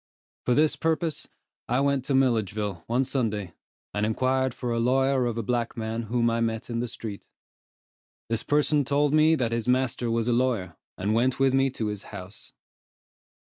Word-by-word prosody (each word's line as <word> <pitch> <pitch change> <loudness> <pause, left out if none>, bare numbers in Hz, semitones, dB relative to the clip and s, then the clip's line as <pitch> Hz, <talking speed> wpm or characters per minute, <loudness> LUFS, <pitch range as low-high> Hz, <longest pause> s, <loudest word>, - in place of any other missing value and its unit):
For 125 - +4
this 155 +1 +3
purpose, 160 -1 -1 0.4
I 125 +2 +2
went 140 -1 +1
to 140 - 0
Milledgeville, 105 -8 0
one 120 +3 +2
Sunday, 105 -9 -2 0.4
and 105 - -1
inquired 130 +4 +1
for 125 0 -4
a 115 - 0
lawyer 130 +1 +2
of 115 -1 -3
a 115 - -1
black 120 +1 -1
man 110 0 -2
whom 120 0 +2
I 115 0 +1
met 115 +1 -2
in 115 - -1
the 120 - -1
street. 110 -3 -7 1.0
This 115 -1 -1
person 150 0 +2
told 145 +2 +1
me 155 +1 +5
that 120 -6 -1
his 115 0 -2
master 125 -1 +1
was 115 0 0
a 120 - +3
lawyer, 115 -9 0 0.2
and 100 +3 0
went 125 +4 +1
with 135 -1 +3
me 135 0 +3
to 110 - -3
his 105 -2 -3
house. 100 0 -10
120 Hz, 185 wpm, -26 LUFS, 110-135 Hz, 1.0 s, me